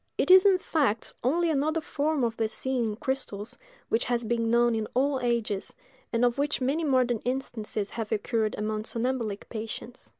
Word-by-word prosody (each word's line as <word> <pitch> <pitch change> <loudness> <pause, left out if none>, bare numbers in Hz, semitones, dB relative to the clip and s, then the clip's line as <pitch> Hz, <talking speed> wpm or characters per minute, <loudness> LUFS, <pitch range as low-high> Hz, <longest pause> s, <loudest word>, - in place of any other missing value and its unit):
It - - +3
is, 375 +2 +9
in 385 -2 +5
fact, 280 - 0
only 330 +6 +2
another 310 +2 +1
form 305 -2 -1
of 230 -1 0
the 225 -1 0
seeing 260 +1 -2
in 215 -1 -2
crystals, 220 -4 -4 0.3
which 225 - +1
has 240 -1 0
been 230 0 0
known 235 0 +4
in 220 -1 -1
all 270 +1 +2
ages, 235 -5 -1 0.4
and 235 +1 +2
of 245 +2 +1
which 290 0 +1
many 275 +6 0
modern 255 -5 +2
instances 230 -5 -3
have 225 -1 -4
occurred 220 0 0
among 215 0 -2
somnambulic 230 -4 -2
patients. 225 +2 -7
240 Hz, 175 wpm, -28 LUFS, 220-270 Hz, 0.4 s, is